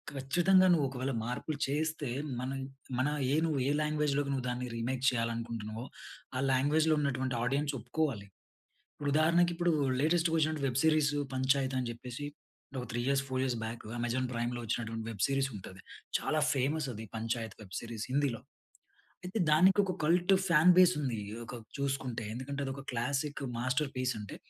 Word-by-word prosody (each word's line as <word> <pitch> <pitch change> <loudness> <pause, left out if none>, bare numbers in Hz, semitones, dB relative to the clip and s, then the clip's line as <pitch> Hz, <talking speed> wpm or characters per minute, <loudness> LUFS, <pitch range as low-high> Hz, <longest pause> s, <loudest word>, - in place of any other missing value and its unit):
ఖచ్చితంగా 175 +8 +4
నువ్వు 155 -5 +4
ఒకవేళ 130 0 -3
మార్పులు 135 +5 -3
చేస్తే 150 -1 -1 0.3
మనం 135 +2 -3 0.4
మన 130 +3 +2 0.3
ఏ - - +4
నువ్వు 150 -4 0
ఏ - - +2
లాంగ్వేజ్‌లోకి 150 -2 +1
నువ్వు 130 -2 -2
దాన్ని 125 +1 -2
రీమేక్ 125 +2 -2
చేయాలనుకుంటున్నావో. 115 -1 -3 0.5
ఆ - - 0
లాంగ్వేజ్‌‌‌లో 155 +4 +3
ఉన్నటువంటి 130 -3 -1
ఆడియన్స్ 140 +3 0
ఒప్పుకోవాలి. 125 -3 -2 0.7
ఇప్పుడు 145 -1 -3
ఉదాహరణకి, 170 +3 +4
ఇప్పుడు 175 0 +2 0.3
లేటెస్ట్‌గా 165 +1 +2
ఒచ్చినటి 155 -2 0
వెబ్ 130 +1 0
సీరీస్ 155 -2 +4 0.2
'పంచాయత్' 130 0 +1
అని 125 - -2
జెప్పేసి. 125 +4 -7 0.5
ఒక 125 - -2
3 120 - 0
ఇయర్స్, 140 0 +2
4 130 0 0
ఇయర్స్ 125 -3 0
బాక్ 115 0 -6
అమెజాన్ 125 +2 0
ప్రైమ్‌లో 120 +1 -2
వచ్చినటువంటి 115 0 -3
వెబ్ 100 -4 -3
సీరీస్ 135 -1 +1
ఉంటది. 95 -1 -9 0.4
చాలా 155 0 0
ఫేమస్ 140 +2 0
అది 110 +1 -7
'పంచాయత్' 115 -1 -3
వెబ్ 95 - -14
సీరీస్ 115 -2 -5
హిందీలో. 135 -4 +1 0.8
అయితే 185 +5 -3
దానికి 190 +6 +6
ఒక 185 - -1
కల్ట్ 180 +4 +4
ఫాన్ 170 +2 +7
బేస్ 180 -1 +6
ఉంది. 125 -6 -1 0.2
ఆహ్, - - -7
ఒక - - -7 0.2
చూసుకుంటే 135 -4 -2
ఎందుకంటే, 140 +3 -4
అది 135 - -3
ఒక 135 - -8
క్లాసిక్ 140 +5 -1 0.2
మాస్టర్ 130 +3 0
పీస్ 130 0 0
అంటే, 105 - -7
135 Hz, 160 wpm, -32 LUFS, 120-150 Hz, 0.8 s, ఫాన్